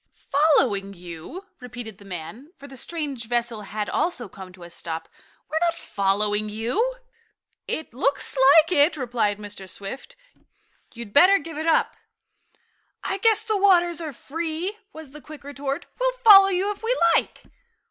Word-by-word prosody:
"Following 265 -10 +1
you?" 175 - -9
repeated 245 -5 -9
the 200 - -15
man, 195 - -9
for 280 - -12
the 270 - -12
strange 280 -4 -5
vessel 235 -2 -1
had 210 +1 -4
also 305 -8 -1
come 190 -1 -11
to 180 -1 -14
a 170 - -11
stop. 165 -1 -6 0.4
"We're 315 - -1
not 340 -1 +1
following 205 +2 -1
you." 250 - -1 0.7
"It 315 -6 -4
looks 275 +3 0
like 280 +5 +6
it," 310 -1 +4
replied 235 -6 -1
Mr. 205 -2 -9
Swift. 265 - -8 0.8
"You'd 230 -3 -9
better 370 +7 +7
give 320 -1 -7
it 315 - -3
up." 325 - +2 1.1
"I 390 - -3
guess 445 +1 +3
the 435 -2 0
waters 350 -4 +3
are 315 -2 -5
free," 325 - -4 0.2
was 315 -6 -11
the 300 +1 -12
quick 305 -1 -12
retort. 280 -1 -5
"We'll - - +1
follow 420 -6 +8
you 390 +2 0
if 410 - -8
we 480 +3 0 0.2
like." - - -1
280 Hz, 160 wpm, -24 LUFS, 210-340 Hz, 1.1 s, follow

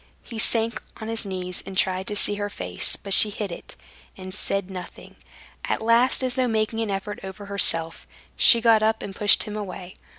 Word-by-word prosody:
He 230 -2 -8
sank 230 +1 +1 0.2
on 220 0 -7
his 225 -2 -1
knees 180 -1 -4
and 190 - -9
tried 185 0 0
to 210 - -4
see 205 - +1
her 205 0 -4
face; 90 - 0
but 195 - -1
she 210 - +9
hid 205 -2 -5
it, - - -10 0.4
and 185 0 -9
said 195 -1 -2
nothing. 180 -1 -10 0.5
At - - -2
last, 235 +4 +3
as 255 -1 0
though 255 0 0
making 220 0 -1
an 225 -2 -2
effort 195 +1 -4
over 190 +2 -9
herself, 165 -5 -1 0.3
she 235 - +6
got 225 -2 +4
up 220 +1 0
and 195 - -8
pushed 205 0 +4
him 210 -1 -7
away. 190 -3 -7
205 Hz, 200 wpm, -23 LUFS, 190-220 Hz, 0.5 s, she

